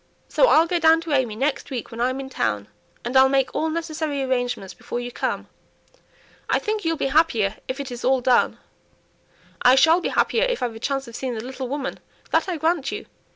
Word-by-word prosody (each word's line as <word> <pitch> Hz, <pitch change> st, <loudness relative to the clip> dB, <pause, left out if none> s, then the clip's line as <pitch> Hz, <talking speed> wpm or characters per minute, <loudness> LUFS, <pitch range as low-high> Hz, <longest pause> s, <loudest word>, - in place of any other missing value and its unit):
"So -, -, +4 dB
I'll 320 Hz, -6 st, +6 dB
go 345 Hz, +1 st, 0 dB
down 325 Hz, 0 st, +5 dB
to 330 Hz, -1 st, -6 dB
AimÄe 255 Hz, -6 st, +1 dB
next 280 Hz, +3 st, -1 dB
week 250 Hz, -3 st, -5 dB
when 230 Hz, +1 st, -5 dB
I'm 255 Hz, +2 st, 0 dB
in 270 Hz, -, -5 dB
town, 105 Hz, -, -2 dB, 0.4 s
and 245 Hz, +2 st, -3 dB
I'll 265 Hz, 0 st, +7 dB
make 270 Hz, -1 st, +1 dB
all 320 Hz, -, 0 dB
necessary 310 Hz, -3 st, -2 dB
arrangements 245 Hz, -6 st, -2 dB
before 240 Hz, -, -5 dB
you 245 Hz, 0 st, -5 dB
come. -, -, -3 dB, 1.0 s
I -, -, +3 dB
think 430 Hz, 0 st, -2 dB
you'll 330 Hz, -1 st, 0 dB
be -, -, -1 dB
happier 230 Hz, -11 st, +2 dB
if 260 Hz, +2 st, -4 dB
it 280 Hz, -2 st, -5 dB
is 240 Hz, 0 st, -7 dB
all 260 Hz, +1 st, +3 dB
done." 250 Hz, 0 st, +2 dB, 1.0 s
"I 250 Hz, +1 st, +6 dB
shall 325 Hz, +6 st, +5 dB
be -, -, -1 dB
happier 475 Hz, +2 st, +2 dB
if -, -, -1 dB
I've 240 Hz, -2 st, -1 dB
a 225 Hz, -, -9 dB
chance 270 Hz, +2 st, -2 dB
of 235 Hz, -, -10 dB
seeing 255 Hz, -2 st, -3 dB
the 220 Hz, +1 st, -5 dB
little 260 Hz, 0 st, -5 dB
woman, 275 Hz, +1 st, -4 dB, 0.3 s
that -, -, +2 dB
I 350 Hz, -, -2 dB
grant 320 Hz, -1 st, 0 dB
you. -, -, -5 dB
270 Hz, 215 wpm, -23 LUFS, 245-320 Hz, 1.0 s, I'll